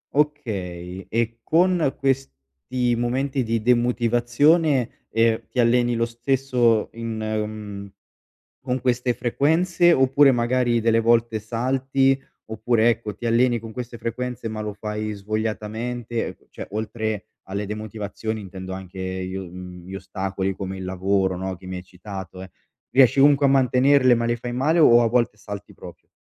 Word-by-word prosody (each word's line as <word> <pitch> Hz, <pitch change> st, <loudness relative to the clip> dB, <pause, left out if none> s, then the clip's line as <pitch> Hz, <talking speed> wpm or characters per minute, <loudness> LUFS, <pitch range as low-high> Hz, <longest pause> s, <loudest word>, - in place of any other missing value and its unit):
Okay, 95 Hz, -12 st, -2 dB
e 115 Hz, 0 st, -1 dB
con 170 Hz, -2 st, +2 dB
questi 120 Hz, -, -2 dB
momenti 130 Hz, +3 st, -1 dB
di 115 Hz, -1 st, -1 dB
demotivazione, 120 Hz, +4 st, +2 dB
ehm, 115 Hz, 0 st, +1 dB
ti 125 Hz, -, -4 dB
alleni 120 Hz, 0 st, +3 dB
lo 115 Hz, 0 st, +1 dB
stesso 120 Hz, -1 st, +1 dB
in 115 Hz, -1 st, -5 dB
mhmm, 105 Hz, -2 st, -4 dB, 0.7 s
con 130 Hz, 0 st, -2 dB
queste 125 Hz, -1 st, 0 dB
frequenze, 165 Hz, +7 st, +2 dB
oppure 135 Hz, +1 st, +5 dB
magari 120 Hz, 0 st, +1 dB
delle 115 Hz, 0 st, +3 dB
volte 115 Hz, -1 st, +2 dB
salti 135 Hz, +4 st, +1 dB, 0.3 s
oppure, 110 Hz, +1 st, +2 dB
ecco, 110 Hz, -3 st, -2 dB
ti 120 Hz, -, -8 dB
alleni 120 Hz, +1 st, +3 dB
con 110 Hz, 0 st, -9 dB
queste 125 Hz, -1 st, -6 dB
frequenze 120 Hz, 0 st, -4 dB
ma 110 Hz, -1 st, -4 dB
lo 105 Hz, -1 st, -4 dB
fai 105 Hz, +1 st, -4 dB
svogliatamente 110 Hz, +3 st, -3 dB
e -, -, -8 dB
cioè -, -, -8 dB
oltre 110 Hz, -1 st, -3 dB, 0.2 s
alle 100 Hz, +2 st, -3 dB
demotivazioni 110 Hz, +1 st, -5 dB
intendo 95 Hz, -1 st, -8 dB
anche 95 Hz, 0 st, -8 dB, 0.3 s
gli 95 Hz, -, -6 dB
uhm, 90 Hz, -1 st, -8 dB
gli 95 Hz, -, -7 dB
ostacoli 95 Hz, 0 st, -3 dB
come 95 Hz, -1 st, -5 dB
il 95 Hz, -, -6 dB
lavoro, 95 Hz, 0 st, 0 dB
no, 95 Hz, +1 st, -4 dB
che 95 Hz, -, -15 dB
mi 90 Hz, 0 st, -5 dB
hai 90 Hz, -, -8 dB
citato, 95 Hz, 0 st, -9 dB
eh, 95 Hz, -, -12 dB, 0.4 s
riesci 130 Hz, 0 st, +5 dB
comunque 140 Hz, 0 st, +5 dB
a -, -, +4 dB
mantenerle 130 Hz, 0 st, +4 dB
ma 115 Hz, 0 st, +1 dB
le 120 Hz, -, +1 dB
fai 120 Hz, +1 st, -5 dB
male 150 Hz, +7 st, +1 dB
o 120 Hz, -7 st, +7 dB
a 115 Hz, -, +3 dB
volte 120 Hz, -3 st, +1 dB
salti 100 Hz, -1 st, -8 dB
proprio? 85 Hz, -3 st, -13 dB
115 Hz, 150 wpm, -23 LUFS, 105-125 Hz, 0.7 s, o